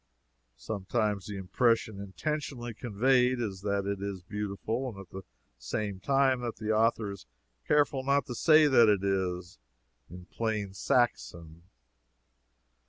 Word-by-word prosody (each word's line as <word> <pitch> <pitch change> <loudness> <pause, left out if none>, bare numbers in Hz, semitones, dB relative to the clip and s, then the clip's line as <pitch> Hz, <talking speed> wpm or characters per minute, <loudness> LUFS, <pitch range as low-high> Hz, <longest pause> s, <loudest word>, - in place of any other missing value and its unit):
Sometimes 105 - -2
the 105 -1 -5
impression 110 +2 +1
intentionally 120 +3 -4
conveyed 125 +3 +2
is 100 -5 -4
that 100 -1 -1
it 100 -1 -3
is 100 -2 -5
beautiful, 105 +4 -4
at 95 -2 -12
the 95 - -7 0.4
same 100 - -3
time 135 +2 +2
that 120 -2 -4
the 110 +1 -3
author 110 -1 +2
is 100 -11 -11 0.4
careful 145 -2 +2
not 140 +1 +2
to 125 - -6
say 155 +5 +5
that 120 -6 +6
it 100 -2 +2
is, 90 -4 -2 0.5
in 90 +1 -11
plain 105 -1 -3
Saxon. 85 -7 -1
105 Hz, 130 wpm, -29 LUFS, 95-125 Hz, 0.5 s, that